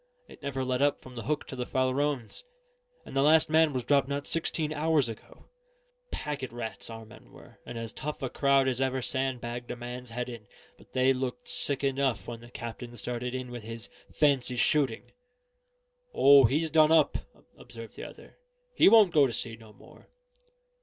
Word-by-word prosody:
It - - -15
never 135 -2 -3
let 130 0 -1
up 145 0 +2
from 130 - -13
the 115 - -7
Hook 150 +1 -1
to - - -8
the 125 -1 -4
Farallones; 130 - -1 0.6
and - - -10
the 135 - +3
last 155 +2 +5
man 160 -1 +4
was 130 -3 -3
dropped 140 +1 +2
not 140 0 -3
sixteen 160 -1 -1
hours 155 -3 +2
ago. 115 -2 -11 0.6
Packet 145 -4 -4
rats 120 -1 -6
our 115 -1 -8
men 110 - -16
were, - - -17
and 120 - -6
as 115 -1 -5
tough 150 0 -5
a - - 0
crowd 140 -1 +3
as 130 0 -1
ever 130 -1 0
sand 130 -1 -1
bagged 120 +1 -6
a - - -3
man's 125 +1 -7
head 125 +1 -4
in; 115 -4 -9 0.3
but - - -22
they 130 +1 +3
looked 130 - -4
sick 140 - +2
enough 135 -2 0
when 120 -1 -6
the 120 +1 -14
captain 120 0 -8
started 125 +3 -4
in 130 -1 -5
with 120 -1 -6
his 115 +1 -6 0.2
fancy 135 -4 +2
shooting." 130 0 +1 1.0
"O, 140 -1 +7
he's 155 +7 +1
done 155 0 +5
up," 160 -3 +4 0.4
observed 115 -1 -11
the - - -8
other. - - -13 0.3
"He - - +6
won't 210 -5 +6
go 145 -3 +5
to - - -5
sea 115 0 -1
no 110 -1 -16
more." - - -18
130 Hz, 190 wpm, -28 LUFS, 120-145 Hz, 1.0 s, O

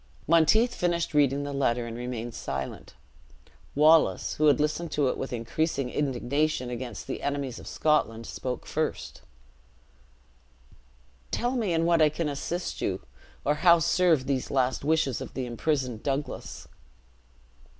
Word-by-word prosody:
'" - - -29
Monteith 170 - +4
finished 170 -1 -1
reading 145 -1 +3
the 145 0 -4
letter, 125 -3 +1
and 115 -1 -6
remained 120 -1 -5
silent. 65 -8 -5 0.8
Wallace, 155 +2 +4
who 155 - +2
had 145 - +5
listened 155 +2 -1
to 145 -3 +2
it - - -1
with 135 - -5
increasing 125 +3 -1
indignation 140 0 -1
against 120 -3 -6
the 135 - -5
enemies 140 -3 -3
of - - -11
Scotland, 115 -7 +1
spoke 125 +1 -5
first: - - -3 2.1
"Tell 240 +1 -1
me 220 -7 0
in 165 0 +1
what 170 -1 +3
I 155 - +6
can 155 +1 -2
assist 170 +5 -4
you: 95 -7 -2 0.4
or 145 - +3
how 170 -1 +7
serve 165 -4 +3
these 135 -2 -1
last 130 -1 0
wishes 150 -4 +1
of - - -8
the 130 - -2
imprisoned 125 -1 -2
Douglas." 140 +1 -4
140 Hz, 145 wpm, -27 LUFS, 125-160 Hz, 2.1 s, how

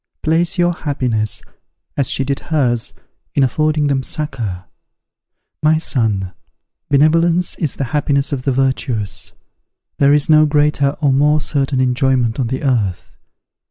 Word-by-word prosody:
Place 165 +3 +1
your 175 0 +2
happiness, 125 - -2 0.5
as 140 -3 +1
she 135 - +1
did 140 +1 -2
hers, 125 -7 0 0.4
in 140 - +3
affording 155 +3 +1
them 140 -2 +1
succour. 115 -11 -4 1.0
My 155 +1 +3
son, 105 - -1 0.6
beneficence 165 +5 +3
is 155 -5 -2
the - - -3
happiness 140 -1 0
of 140 -3 -2
the 135 - 0
virtuous: 125 -7 -1 0.7
there 140 0 +5
is 145 +1 +3
no 155 -1 +5
greater 145 -1 +1
or 140 -3 +3
more 150 +3 +3
certain 140 -3 -1
enjoyment 125 -1 +1
on 125 - 0
the 130 +4 -4
earth. 110 -9 -1
140 Hz, 135 wpm, -17 LUFS, 125-150 Hz, 1.0 s, there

